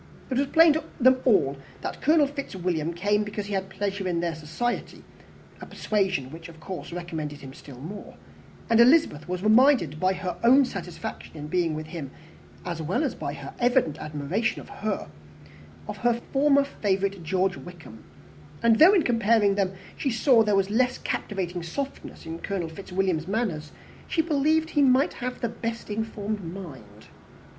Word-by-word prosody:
It 255 - 0
was 280 - +1
plain 325 +1 +6
to 315 0 -2 0.2
them 255 0 +5
all 140 - +3 0.2
that - - -5
Colonel 305 +1 +4
Fitzwilliam 180 - -3
came 205 +4 +1
because 205 0 -5
he 205 - -5
had 190 -1 -2
pleasure 200 -1 -3
in 175 -2 0
their 170 -1 -1
society, 160 +11 -4 0.6
a - - -8
persuasion 190 -11 -1
which 165 +2 -10
of 165 -1 -14
course 180 +2 -7
recommended 160 -4 -5
him 135 -1 -10
still 140 -2 -12
more; 175 +10 -9 0.5
and 230 0 +3
Elizabeth 240 - +4
was 180 0 -3
reminded 215 - +4
by 185 +1 +2
her 180 -2 -4
own 260 +4 +6
satisfaction 175 -6 -7
in 150 - -6
being 165 0 0
with 155 0 -5
him, 155 -4 -6 0.6
as 170 -2 -4
well 190 - 0
as - - -1
by - - -5
his - - -8
evident 245 - +2
admiration, 155 +10 -2
of - - -12 1.3
her 240 -1 +2 0.2
former 280 0 +4
favourite, 200 -7 -1
George 185 +3 0
Wickham; 165 -11 -12 0.6
and 230 -1 +4
though, 355 +6 +8
in 355 - +4
comparing 225 -3 +3
them, 195 -1 0 0.2
she 275 - -1
saw 240 0 +4
there 210 -2 +2
was 195 0 +1
less 250 +3 +2
captivating 180 -4 -3
softness 265 +10 -6
in 165 +1 -6
Colonel 185 -4 -3
Fitzwilliam's 180 -1 -2
manners, 185 -8 -2 0.4
she 325 - +1
believed 315 +1 +1
he 295 - +2
might 265 +1 +4
have 250 0 -4
the 235 - +1
best 230 -1 -5
informed 215 -1 -3
mind. 135 - -9
195 Hz, 165 wpm, -26 LUFS, 170-240 Hz, 1.3 s, though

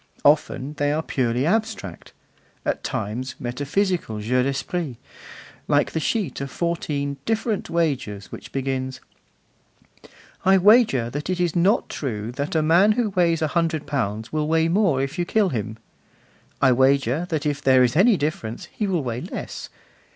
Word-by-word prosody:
Often, 145 -1 +2
they 145 0 +2
are 155 +2 -1
purely 125 -2 0
abstract; 215 - -2 0.5
at - - -1
times, 125 +5 -3
metaphysical 145 - -1
'jeux 125 +4 +1
d'esprit,' 135 +2 -2 0.7
like 145 0 +2
the 160 - -1
sheet 170 - -1
of 140 - -4
fourteen 145 -3 -2
'Different 220 -1 -1
Wagers,' 135 - -1
which - - -9
begins: 130 -1 -3 1.4
I 190 +1 +5
wager 190 - +4
that 145 +5 -4
it 185 -1 -1
is 175 -1 0
not 185 +5 +3
true 115 -5 -4
that 140 +5 -4
a 155 - +3
man 175 +7 +5
who 225 -2 0
weighs 170 -4 +2
a 155 - +1
hundred 165 -2 0
pounds 110 -5 -3
will 155 -1 0
weigh 160 +1 +2
more 170 -8 +2
if 140 +6 -4
you - - +2
kill 210 +1 +2
him. 110 - -4 0.8
I 130 - +5
wager 135 +4 +2
that 155 -3 -2
if 145 -1 -1
there 130 -2 +5
is 125 +1 +1
any 200 +5 +5
difference, 145 -7 -3
he 210 - -2
will 175 -6 0
weigh 120 -1 -3
less. - - -6
145 Hz, 160 wpm, -23 LUFS, 130-175 Hz, 1.4 s, I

